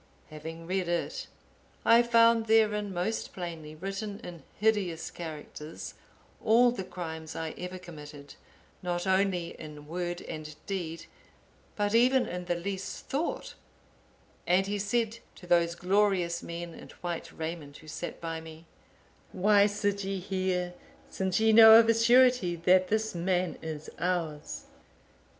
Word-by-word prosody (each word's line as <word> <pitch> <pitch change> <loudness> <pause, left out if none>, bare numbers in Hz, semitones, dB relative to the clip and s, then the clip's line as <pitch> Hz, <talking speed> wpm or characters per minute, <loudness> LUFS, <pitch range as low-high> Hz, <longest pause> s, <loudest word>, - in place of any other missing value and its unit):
Having 160 +2 -8
read 185 +1 -1
it, 175 -1 -2 0.6
I 230 +1 +7
found 230 -1 +4
therein 210 -2 +3
most 185 +5 -2
plainly 165 -4 -6
written 195 +4 -5
in 170 -2 -9 0.2
hideous 200 -6 +1
characters, 155 -1 -8 0.5
all 235 +2 +5
the 235 -6 -4
crimes 160 -3 -7
I 160 -1 -3
ever 180 +1 -6
committed, 150 -5 -11 0.5
not 175 0 -2
only 190 -2 +1
in 150 -2 -9
word 175 +2 -4
and 155 -2 -7
deed, 170 -4 -4 0.7
but 205 0 0
even 250 +3 +5
in 180 0 -5
the 175 0 0
least 190 +2 -5
thought; 330 - -2 0.9
and 185 +2 +4
he 205 +1 -2
said 225 +2 0 0.2
to 180 - -13
those 170 -1 +3
glorious 180 -2 +1
men 170 0 -6
in - - -12
white 175 -2 -4
raiment 160 -3 -6
who 155 - -16
sat 160 +3 -6
by 165 -1 -4
me, 160 0 -12 0.7
'Why 200 +2 +4
sit 205 -1 -1
ye 195 0 -2
here, 185 -1 -1 0.4
since 190 0 0
ye 220 0 +4
know 220 0 +11
of 230 - +4
a 230 - +5
surety 240 -5 +4
that 185 +2 +4
this 220 +2 0
man 180 0 0
is 155 -1 -6
ours? 170 -4 -2
180 Hz, 140 wpm, -29 LUFS, 165-210 Hz, 0.9 s, know